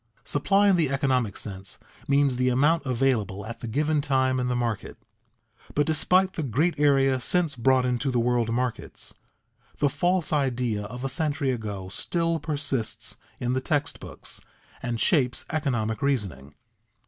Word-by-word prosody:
Supply 195 Hz, +7 st, +3 dB
in 195 Hz, -2 st, +5 dB
the 160 Hz, -5 st, +2 dB
economic 130 Hz, -6 st, 0 dB
sense 95 Hz, -2 st, -5 dB, 0.3 s
means 140 Hz, -2 st, +3 dB
the 125 Hz, 0 st, +2 dB
amount 145 Hz, +5 st, +2 dB
available 115 Hz, -6 st, 0 dB
at 115 Hz, +1 st, -7 dB
the 120 Hz, -, -6 dB
given 150 Hz, +6 st, +1 dB
time 130 Hz, -3 st, +1 dB
in 125 Hz, -, 0 dB
the 125 Hz, -, 0 dB
market; 120 Hz, -3 st, -2 dB, 0.8 s
but 145 Hz, -, +3 dB
despite 180 Hz, +4 st, +2 dB
the 165 Hz, -, -3 dB
great 150 Hz, +5 st, 0 dB
areas 135 Hz, -3 st, +3 dB
since 170 Hz, +1 st, +2 dB
brought 130 Hz, +1 st, +3 dB
into 125 Hz, +2 st, 0 dB
the 125 Hz, -, 0 dB
world 120 Hz, -1 st, +1 dB
markets, 120 Hz, -1 st, -3 dB, 0.6 s
the 145 Hz, -, +2 dB
false 175 Hz, +2 st, +1 dB
idea 125 Hz, -7 st, 0 dB
of 125 Hz, +5 st, -6 dB
a -, -, +1 dB
century 140 Hz, 0 st, 0 dB
ago 105 Hz, -6 st, -4 dB
still 165 Hz, -, -1 dB
persists 140 Hz, -7 st, -2 dB, 0.2 s
in 125 Hz, 0 st, -1 dB
the 130 Hz, -, 0 dB
text 145 Hz, +1 st, -1 dB
books, -, -, -6 dB, 0.4 s
and 120 Hz, -2 st, -3 dB
shapes 125 Hz, -6 st, +2 dB
economic 120 Hz, -9 st, -1 dB
reasoning. 100 Hz, -, -1 dB
130 Hz, 155 wpm, -26 LUFS, 120-150 Hz, 0.8 s, in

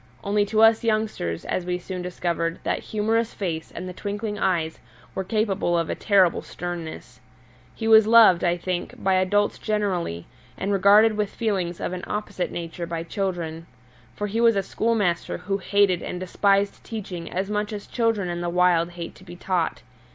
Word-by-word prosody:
Only 205 Hz, +1 st, +2 dB
to 220 Hz, +1 st, +3 dB
us 225 Hz, 0 st, +5 dB
youngsters, 215 Hz, -, -1 dB
as 185 Hz, -, -1 dB
we 180 Hz, 0 st, -2 dB
soon 180 Hz, 0 st, -6 dB
discovered, 170 Hz, -2 st, -2 dB
that -, -, 0 dB
humorous 220 Hz, +2 st, -1 dB
face 165 Hz, -5 st, -4 dB
and 185 Hz, -, -6 dB
the 180 Hz, -, -6 dB
twinkling 205 Hz, +2 st, -4 dB
eyes 165 Hz, -4 st, 0 dB, 0.3 s
were 190 Hz, -, -2 dB
capable 195 Hz, -3 st, 0 dB
of 165 Hz, -1 st, -1 dB
a -, -, 0 dB
terrible 190 Hz, -4 st, +3 dB
sternness. 175 Hz, -2 st, -7 dB, 0.6 s
He 225 Hz, -, -3 dB
was 220 Hz, -1 st, +7 dB
loved, 220 Hz, -6 st, +7 dB
I 175 Hz, 0 st, +2 dB
think, 175 Hz, 0 st, -3 dB
by 190 Hz, -, +3 dB
adults 185 Hz, +2 st, +2 dB
generally, 190 Hz, -, -1 dB, 0.3 s
and 195 Hz, +2 st, -2 dB
regarded 210 Hz, +3 st, +5 dB
with 210 Hz, -1 st, 0 dB
feelings 190 Hz, -7 st, -2 dB
of -, -, -3 dB
an 180 Hz, -, -5 dB
opposite 210 Hz, -3 st, -3 dB
nature 170 Hz, 0 st, -5 dB
by 165 Hz, -1 st, -3 dB
children. 170 Hz, -3 st, -3 dB, 0.5 s
For 210 Hz, -, -3 dB
he 215 Hz, +3 st, -1 dB
was 230 Hz, -2 st, +5 dB
a 195 Hz, -, +1 dB
schoolmaster 205 Hz, -5 st, 0 dB
who 195 Hz, +2 st, -2 dB
hated 195 Hz, -2 st, +2 dB
and 180 Hz, -, -5 dB
despised 200 Hz, +2 st, +1 dB
teaching 190 Hz, -6 st, -6 dB
as 190 Hz, +3 st, -2 dB
much 210 Hz, +1 st, -1 dB
as 205 Hz, -1 st, -6 dB
children 225 Hz, -5 st, 0 dB
in 175 Hz, 0 st, -3 dB
the 175 Hz, -, -1 dB
wild 175 Hz, -1 st, +3 dB
hated 170 Hz, -1 st, -7 dB
to -, -, -16 dB
be 175 Hz, -2 st, -10 dB
taught. 175 Hz, -6 st, -1 dB
190 Hz, 180 wpm, -24 LUFS, 175-210 Hz, 0.6 s, was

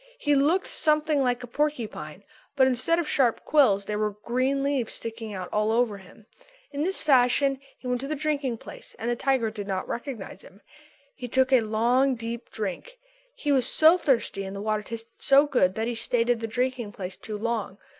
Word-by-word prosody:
He 295 Hz, -11 st, +1 dB
looked 305 Hz, +7 st, +3 dB
something 305 Hz, -1 st, +1 dB
like 250 Hz, -1 st, 0 dB
a -, -, -7 dB
porcupine; 235 Hz, -, -3 dB, 0.3 s
but 265 Hz, -2 st, +5 dB
instead 260 Hz, +6 st, +2 dB
of 340 Hz, -3 st, -1 dB
sharp 250 Hz, -6 st, +1 dB
quills 215 Hz, -10 st, +4 dB
there 210 Hz, 0 st, -3 dB
were 215 Hz, 0 st, +1 dB, 0.2 s
green 260 Hz, +3 st, 0 dB
leaves 275 Hz, -5 st, -1 dB
sticking 225 Hz, -1 st, -6 dB
out 185 Hz, -1 st, -5 dB
all 210 Hz, +1 st, +1 dB
over 225 Hz, -3 st, +1 dB
him. 190 Hz, +3 st, -17 dB, 0.5 s
In 285 Hz, 0 st, -4 dB
this 375 Hz, +5 st, +1 dB
fashion 270 Hz, 0 st, +3 dB, 0.2 s
he -, -, -18 dB
went 250 Hz, 0 st, -1 dB
to 275 Hz, -, -4 dB
the 305 Hz, -, -2 dB
drinking 285 Hz, -5 st, -1 dB
place -, -, -11 dB
and 235 Hz, +2 st, -2 dB
the -, -, 0 dB
tiger 250 Hz, -3 st, 0 dB
did 205 Hz, -2 st, -7 dB
not 190 Hz, -1 st, -3 dB
recognise 235 Hz, -4 st, -6 dB
him. 195 Hz, +3 st, -16 dB, 0.5 s
He 250 Hz, -2 st, -7 dB
took 260 Hz, +2 st, +2 dB
a 255 Hz, -, +6 dB
long, 240 Hz, +5 st, +2 dB
deep 235 Hz, +1 st, -6 dB
drink. 220 Hz, -, -5 dB, 0.4 s
He 295 Hz, -, -2 dB
was 260 Hz, -3 st, +3 dB
so 320 Hz, +2 st, +6 dB
thirsty 265 Hz, -, 0 dB
and 190 Hz, 0 st, -6 dB
the -, -, -5 dB
water 215 Hz, 0 st, -1 dB
tasted 225 Hz, +2 st, -8 dB
so 280 Hz, 0 st, +5 dB
good 190 Hz, -10 st, +2 dB
that 220 Hz, +1 st, -1 dB
he 240 Hz, -, -1 dB
stayed 230 Hz, +1 st, 0 dB
in 240 Hz, -, 0 dB
the 225 Hz, -, -3 dB
drinking 245 Hz, -2 st, -2 dB
place 190 Hz, -5 st, -6 dB
too 215 Hz, -1 st, -7 dB
long. 220 Hz, -3 st, -3 dB
245 Hz, 205 wpm, -26 LUFS, 220-275 Hz, 0.5 s, a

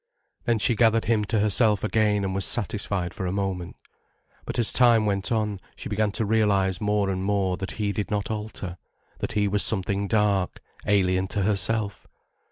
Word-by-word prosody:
Then 120 Hz, -1 st, +2 dB
she 115 Hz, +2 st, +2 dB
gathered 115 Hz, 0 st, +3 dB
him 110 Hz, -1 st, +1 dB
to 110 Hz, +2 st, 0 dB
herself 105 Hz, 0 st, +3 dB
again 105 Hz, -2 st, +1 dB
and 95 Hz, -, -2 dB
was 95 Hz, 0 st, -1 dB
satisfied 100 Hz, -5 st, -1 dB
for 95 Hz, -, -4 dB
a -, -, -2 dB
moment. 95 Hz, -3 st, -3 dB, 0.7 s
But -, -, -4 dB
as 120 Hz, -3 st, +2 dB
time 120 Hz, -3 st, +4 dB
went 100 Hz, 0 st, -1 dB
on, 105 Hz, -3 st, -1 dB, 0.2 s
she -, -, -7 dB
began 105 Hz, 0 st, 0 dB
to 110 Hz, -, -1 dB
realize 100 Hz, -3 st, +1 dB
more 105 Hz, -2 st, +1 dB
and 95 Hz, 0 st, -3 dB
more 95 Hz, -2 st, 0 dB
that 95 Hz, -1 st, -5 dB
he 105 Hz, -2 st, -2 dB
did 105 Hz, 0 st, -3 dB
not 105 Hz, 0 st, -2 dB
alter, 105 Hz, -5 st, -6 dB, 0.4 s
that -, -, -3 dB
he 105 Hz, -1 st, +1 dB
was 100 Hz, +1 st, +2 dB
something 100 Hz, -1 st, 0 dB
dark, 100 Hz, -3 st, +1 dB, 0.3 s
alien 95 Hz, -2 st, +2 dB
to 100 Hz, +1 st, -1 dB
herself. 105 Hz, +1 st, +1 dB
105 Hz, 180 wpm, -25 LUFS, 95-110 Hz, 0.7 s, time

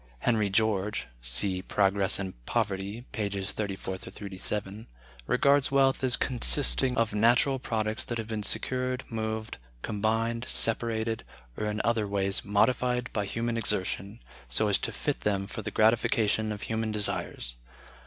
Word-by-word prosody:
Henry 110 Hz, -4 st, +2 dB
George 105 Hz, 0 st, +1 dB, 0.2 s
(see 65 Hz, +11 st, 0 dB
"Progress 100 Hz, 0 st, +2 dB
and 95 Hz, -2 st, -4 dB
Poverty," 105 Hz, 0 st, -2 dB
pp. 100 Hz, -3 st, -2 dB
34 95 Hz, -2 st, -4 dB
37) 100 Hz, +2 st, -5 dB, 0.4 s
regards 140 Hz, -1 st, +3 dB
wealth 135 Hz, -1 st, +3 dB
as 125 Hz, -2 st, +4 dB
consisting 125 Hz, -, +4 dB
"of 115 Hz, -2 st, +1 dB
natural 120 Hz, +5 st, +3 dB
products 110 Hz, -3 st, -2 dB
that 120 Hz, -, -3 dB
have 115 Hz, -, -3 dB
been 110 Hz, -1 st, -3 dB
secured, 125 Hz, +4 st, -1 dB
moved, 110 Hz, -, -3 dB, 0.2 s
combined, 115 Hz, +3 st, 0 dB
separated, 115 Hz, 0 st, 0 dB, 0.3 s
or 105 Hz, -, -2 dB
in 105 Hz, 0 st, -2 dB
other 115 Hz, -3 st, +1 dB
ways 100 Hz, -1 st, 0 dB
modified 125 Hz, +4 st, +1 dB
by 105 Hz, -2 st, 0 dB
human 115 Hz, +3 st, -2 dB
exertion, 100 Hz, 0 st, -2 dB, 0.3 s
so 105 Hz, -, +2 dB
as 100 Hz, -, +3 dB
to -, -, -2 dB
fit -, -, -2 dB
them 100 Hz, -2 st, 0 dB
for 110 Hz, +3 st, -6 dB
the -, -, -4 dB
gratification 110 Hz, -1 st, +2 dB
of 105 Hz, -1 st, -5 dB
human 110 Hz, -1 st, -2 dB
desires.... 100 Hz, -, -2 dB
110 Hz, 140 wpm, -28 LUFS, 100-115 Hz, 0.4 s, as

